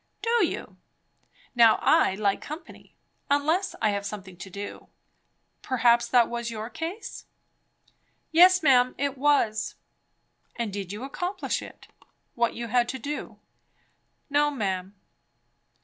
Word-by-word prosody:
"Do 465 -2 +3
you! - - -7 0.8
Now 230 -3 +6
I 190 - +3
like 200 -1 0
company; 315 +2 -10 0.3
unless 315 +7 +1
I 215 - +4
have 200 0 -2
something 200 -2 -7
to 190 - -9
do. 200 +2 -8 0.7
Perhaps 240 -2 +3
that 240 -2 +4
was 235 0 -4
your 220 +1 -6
case, 345 +7 -6 0.4
eh?" - - -38 0.4
"Yes, 365 +2 +6
ma'am, 255 -3 +4
it 280 -1 -1
was." 260 -6 +1 0.8
"And 230 -4 -3
did 195 -2 -5
you 210 +4 -6
accomplish 355 +8 -3
it? - - -12 0.5
what 235 0 0
you 235 -1 -5
had 240 +1 +2
to 265 - -3
do." 285 +4 -6 0.9
"No, 290 0 +2
ma'am." 195 -7 -3
240 Hz, 130 wpm, -26 LUFS, 215-295 Hz, 0.9 s, Now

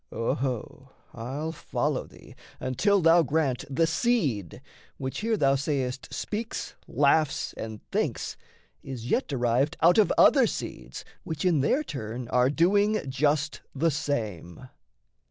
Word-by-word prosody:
Oho, 125 +3 -3 0.2
I'll 135 +7 -4
follow 160 - -2
thee - - -16 0.3
until 195 +10 +2
thou 165 +1 +6
grant 145 -4 0
The 140 +4 +2
seed 160 - 0 0.4
(which 130 -1 -4
here 225 0 0
thou 135 -6 +3
say'st 135 -2 -2
speaks, 220 +2 -4
laughs, 155 -1 +2
and 110 -1 -8
thinks) - - -1 0.5
Is 125 -3 -6
yet 260 - +1
derived 130 +3 +1
out 175 +6 +5
of 215 - +4
other - - +6
seeds - - -6 0.2
Which 160 -3 -4
in 165 -6 +3
their 265 - +2
turn 120 - -6
are 125 +1 +3
doing 200 +4 +2
just 150 +3 0
the 160 +4 +2
same. 125 - -4
140 Hz, 130 wpm, -27 LUFS, 125-165 Hz, 0.5 s, thou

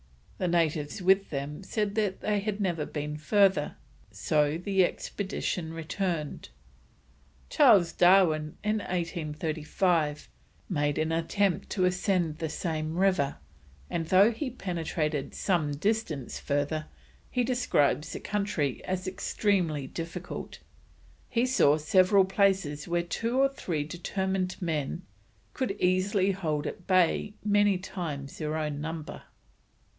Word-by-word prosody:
The 185 - 0
natives 160 -1 0
with 190 +2 +4
them 145 +2 -4
said 205 +1 -2
they 210 0 0
had 210 0 -3
never 175 -6 -1
been 150 0 -4
further, 190 -1 +2 0.3
so 150 +9 +1
the 190 +1 +2
expedition 180 -3 -3
returned. 165 -1 -3 1.0
Charles 175 -5 +5
Darwin, 175 -4 +4
in 210 +1 +1
1835, 160 -2 -1 0.4
made 145 -5 0
an 155 +1 0
attempt 175 +4 0
to 185 -3 +1
ascend 180 -3 0
the 160 - -2
same 155 -1 -3
river, 185 -7 +2 0.6
and 165 -2 -2
though 195 +6 +6
he 255 +4 -3
penetrated 160 - -3
some 160 -7 0
distance 160 - -2
further, 145 +2 -1 0.4
he 250 - 0
describes 235 - +1
the - - -4
country 200 -10 -2
as 185 0 -3
extremely 185 -6 0
difficult; 170 +5 -6 0.7
he 235 0 +2
saw 155 - +4
several 185 +5 +4
places 190 -7 +1
where 170 0 0
two 230 +8 -2
or 275 +1 +4
three 170 - -3
determined 185 +3 -2
men 165 0 -2 0.5
could 255 -7 -1
easily 185 +2 +2
hold 155 -6 -2
at 180 - -6
bay 185 +2 +2
many 205 -2 +4
times 155 -7 -6
their 155 0 -2
own 150 -2 -2
number. 160 0 -5
175 Hz, 120 wpm, -28 LUFS, 155-195 Hz, 1.0 s, though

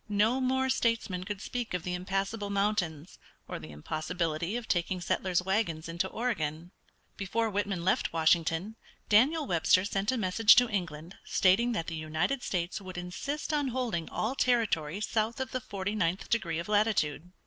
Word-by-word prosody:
No 215 +5 +2
more 260 +1 +1
statesmen 230 -8 0
could 205 0 -5
speak 245 -6 -3
of 180 - -3
the 180 - -3
impassable 195 +3 -2
mountains 195 -6 -1 0.3
or - - -5
the 80 0 -10
impossibility 160 - -2
of 240 -2 -6
taking 180 +1 0
settlers' 180 +1 0
wagons 185 -5 -1
into 170 +3 -1
Oregon. 175 -8 -3 0.5
Before 220 +3 -1
Whitman 195 -3 -2
left 190 - +2
Washington 165 +5 +1 0.3
Daniel 285 +9 +4
Webster 180 -1 +3
sent 200 +2 0
a 260 - -1
message 215 +2 +5
to 245 +1 +5
England 175 -4 -4
stating 220 +6 +3
that 165 -7 -2
the 165 - -5
United 160 - -1
States 180 0 -2
would 185 -2 -8
insist 280 - -4
on 290 -2 +1
holding 235 -10 -2
all 225 +4 -1
territory 210 - +1
south 220 +2 -1
of 265 0 -3
the 255 - -2
forty 200 -2 -4
ninth 185 -3 0
degree 170 -8 +1
of 170 - -4
latitude. 205 -6 +1
195 Hz, 165 wpm, -30 LUFS, 170-225 Hz, 0.5 s, message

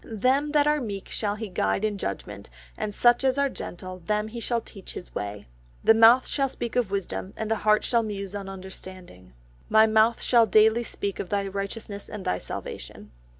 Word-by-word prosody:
"Them 260 +7 +1
that 295 -1 +4
are 300 0 +2
meek 200 -5 -5
shall 205 -2 -1
He 220 +1 -5
guide 180 - 0
in 205 -2 -2
judgement, 100 - -5 0.3
and 210 - -3
such 240 +4 +4
as 265 0 +2
are 280 0 +2
gentle 185 -5 -7
them 210 +4 -1
shall 235 0 0
He - - -25
teach 195 -3 -10
His 180 - -9
way." 105 0 -5 0.4
"My - - +7
mouth 230 +3 +7
shall 275 -2 0
speak 235 -2 -5
of 245 -5 +1
wisdom 195 0 -4
and 220 0 -3
my - - +3
heart 215 0 +3
shall 235 -2 +2
muse 200 -3 -5
on 200 -1 -5
understanding." 185 - -10 0.4
"My 220 0 +6
mouth 220 +1 +3
shall 235 -2 +4
daily 220 +3 +5
speak 200 -3 -4
of 180 - -4
Thy 200 -1 0
righteousness 200 +1 -5
and 210 -3 -7
Thy 90 - 0
salvation." - - -8
210 Hz, 195 wpm, -26 LUFS, 190-230 Hz, 0.4 s, My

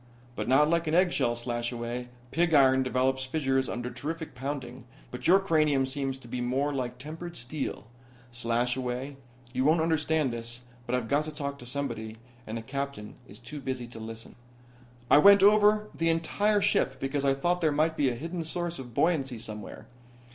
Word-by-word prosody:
"But - - -3
not 135 +4 +5
like 170 +1 +1
an 155 - +1
eggshell, 175 -10 +2
Slashaway. 120 0 -3 0.2
Pig 165 -1 +2
iron 130 -2 +6
develops 130 +1 0
fissures 135 -2 0
under 120 +1 -4
terrific 155 +6 -5
pounding 130 -1 -5 0.3
but 125 +1 -4
your 190 +3 +7
cranium 155 -7 +2
seems 135 0 -3
to 130 - -14
be 125 +1 -4
more 135 +4 0
like 125 -2 -3
tempered 160 +6 -8
steel. 130 +1 -5 0.5
Slashaway, 125 +3 -2 0.4
you 130 0 0
won't 155 +4 +4
understand 160 -4 +1
this, 120 +1 -6 0.3
but 125 - 0
I've 125 -3 -2
got 145 +4 +1
to 155 - -5
talk 140 -2 -5
to 120 - -11
somebody 120 -5 -4 0.3
and 110 +1 -4
the 115 - -6
Captain 140 -4 -5
is 100 - -12
too 130 +5 -8
busy 130 -2 -3
to 115 - -10
listen. 115 0 -8 0.8
"I 145 - +9
went 200 +3 +8
over 210 +1 +5
the 165 0 0
entire 205 +6 +1
ship 135 -9 +2
because 135 +1 -2
I 135 -1 +3
thought 175 +6 0
there 155 -2 +3
might 155 +2 +1
be 140 -4 +2
a 120 - -3
hidden 165 +6 -4
source 170 0 -3
of 120 -3 -9
buoyancy 140 -4 +1
somewhere. 110 -2 -8
135 Hz, 180 wpm, -28 LUFS, 125-160 Hz, 0.8 s, I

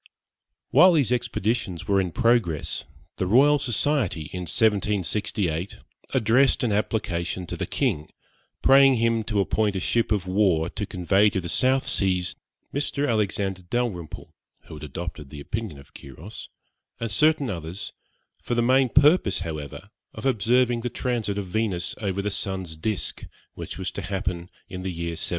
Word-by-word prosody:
While 180 +7 +7
these 140 -7 +2
expeditions 115 -6 -1
were 100 -1 +3
in 90 -2 -3
progress, 115 - +1 0.3
the 95 - -1
Royal 140 +8 +5
Society, 110 - 0
in 90 -2 -4
1768, 100 -4 0 0.3
addressed 130 +2 +3
an 120 - +1
application 95 -4 -1
to - - -5
the - - -4
king, 75 +1 -1 0.5
praying 135 0 +7
him 115 -1 +1
to 105 -2 -1
appoint 105 +1 +1
a - - 0
ship 115 +5 0
of 100 -4 +1
war 90 -4 +2
to 105 -1 -4
convey 95 +3 +3
to 95 - -2
the 90 - -6
South 130 +8 +2
Seas 90 -2 0 0.4
Mr. 145 0 -1
Alexander 100 -4 0
Dalrymple 90 -5 -4 0.3
(who - - -11
had 75 0 -9
adopted 75 0 -6
the 75 - -9
opinion 100 +1 -5
of 70 +1 -16
Quiros), 80 +10 -9 0.5
and 115 -2 -3
certain 150 +1 +3
others, 90 +2 -6 0.5
for 120 - -2
the 120 - +2
main 130 +1 +4
purpose, 140 - +4
however, 75 -5 -6 0.2
of - - -7
observing 125 0 +2
the 125 - -2
transit 115 -4 -2
of 100 - -2
Venus 95 -2 -2
over 100 -1 -2
the 105 - -1
sun's 95 -4 -3
disc, 95 +4 -3 0.3
which - - -7
was - - -3
to - - -5
happen 90 -2 -3 0.2
in 90 - -7
the 95 - -3
year 85 0 -4
1769. 80 - -6
100 Hz, 160 wpm, -25 LUFS, 90-120 Hz, 0.5 s, While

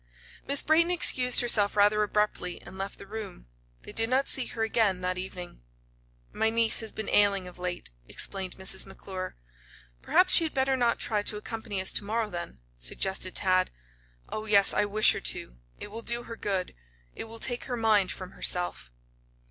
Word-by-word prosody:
Miss 280 0 +3
Brayton 330 +2 +3
excused 255 -8 +4
herself 210 -4 +1
rather 210 +1 +4
abruptly 210 -3 -1
and 175 - -12
left 195 +1 -5
the - - -11
room. 210 - -8 0.4
They - - -9
did 225 0 0
not 265 +2 +1
see 260 - +2
her 225 - -4
again 215 -4 +1
that 180 0 -2
evening. 180 - -8 0.7
"My 220 - +1
niece 230 0 +5
has 225 -1 -5
been 220 - -6
ailing 200 -2 +3
of 180 - -13
late," 180 - -5 0.2
explained 190 -2 -1
Mrs. 190 0 -3
McClure. 190 -1 -8 0.7
"Perhaps 365 - +3
she - - +8
had 320 - -4
better 265 0 +1
not 240 -2 +1
try 210 -2 0
to 210 0 -1
accompany 210 -2 -5
us 190 - +1
to - - 0
morrow, 215 +1 -2
then," 170 - -6 0.2
suggested 185 - -2
Tad. 185 -1 +3 0.6
"Oh, 215 - -6
yes, 200 -2 +5
I 210 - +2
wish 215 +1 +4
her - - -4
to. - - -5 0.2
It 205 - -9
will 225 +2 -6
do 235 +1 -2
her 230 - -8
good 195 -4 -3 0.4
it - - -6
will 225 0 -9
take 245 0 -3
her 245 -2 -4
mind 215 -4 +2
from 185 0 -8
herself." 175 - 0
205 Hz, 185 wpm, -27 LUFS, 185-230 Hz, 0.7 s, she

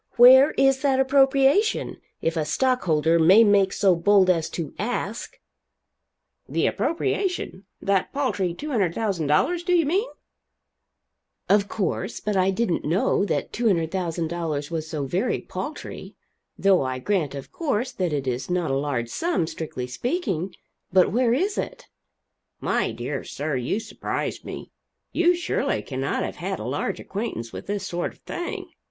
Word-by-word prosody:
Where 260 +4 +9
is 270 -1 +3
that 270 -2 +2
appropriation? 275 +9 +3 0.3
if 165 +1 0
a 160 - 0
stockholder 165 - +2
may 185 +8 +7
make 200 -3 +4
so 195 -3 +3
bold 185 +2 +4
as 165 -3 -1
to 165 -5 -5
ask." 220 0 -3 1.1
"The - - +1
appropriation? 345 - -1 0.2
that 195 -2 +1
paltry 205 -11 -1
$200,000, 205 - 0
do 360 0 +2
you 335 -3 +3
mean?" 390 +11 0 1.4
"Of 200 0 +3
course 195 0 -2
but 210 -1 -2
I 190 0 +3
didn't 195 -2 0
know 180 +5 +1
that - - -2
$200,000 170 -6 -1
was 160 -1 -3
so 150 -4 -3
very 180 - 0
paltry. - - -7 0.4
Though 195 -2 +4
I 130 -1 -2
grant, 155 -1 -1
of 140 - -8
course, 265 -7 -1
that 180 -3 -2
it 140 -2 -2
is 125 0 -3
not 175 -5 0
a - - +1
large 135 -4 -1
sum, 335 - 0
strictly 155 -6 -5
speaking. 195 - -2 0.4
But 185 -1 +4
where 240 +2 +2
is 390 +8 0
it?" - - -5 0.7
"My - - 0
dear - - -4
sir, 145 0 -3
you 130 - -1
surprise - - -4
me. - - -8 0.4
You 350 +1 +3
surely 350 - -1
cannot - - -2
have - - -5
had - - -3
a - - -5
large - - -2
acquaintance 195 - -5
with - - -8
this 200 -1 -2
sort 175 -1 -3
of - - -25
thing. 350 0 -5
195 Hz, 145 wpm, -24 LUFS, 160-255 Hz, 1.4 s, Where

